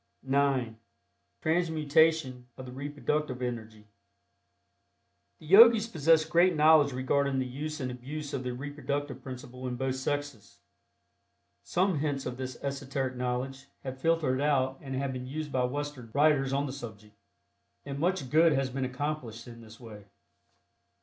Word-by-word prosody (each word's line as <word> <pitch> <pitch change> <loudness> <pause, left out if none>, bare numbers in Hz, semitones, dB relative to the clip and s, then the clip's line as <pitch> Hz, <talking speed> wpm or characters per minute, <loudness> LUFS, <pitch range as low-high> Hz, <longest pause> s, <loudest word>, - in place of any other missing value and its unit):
(9) 135 -4 +1 0.6
TRANSMUTATION 160 -5 +2
OF 130 - -8
THE 125 - -9
REPRODUCTIVE 145 0 -3
ENERGY. 110 -4 -5 1.5
The - - -16
Yogis 220 +5 +8
possess 160 -4 +3
great 175 +2 +3
knowledge 155 -2 +5
regarding 135 +2 0
the 130 - 0
use 150 +5 -5
and 130 -2 -3
abuse 145 +4 -7
of 135 - -2
the 125 - -3
reproductive 145 +2 -4
principle 130 0 -8
in 125 - -3
both 130 +1 -1
sexes. 140 -6 -4 1.0
Some 180 -3 0
hints 145 -2 -2
of 125 - -4
this 130 -1 -5
esoteric 135 -1 -3
knowledge 125 +2 -3 0.2
have 130 0 -6
filtered 160 -5 +1
out 135 -2 +1
and 135 -2 -5
have 135 0 -2
been 125 0 -6
used 150 +2 -5
by 125 -2 +1
Western 140 -2 -5
writers 145 -2 +3
on 140 +1 0
the 130 - -5
subject, 110 -5 -10 0.7
and 140 -1 -5
much 175 -5 -1
good 160 +1 +5
has 135 -2 0
been 135 0 -2
accomplished 125 -3 -4
in 115 -1 -11
this 110 0 -14
way. 105 -4 -11
135 Hz, 145 wpm, -29 LUFS, 125-150 Hz, 1.5 s, Yogis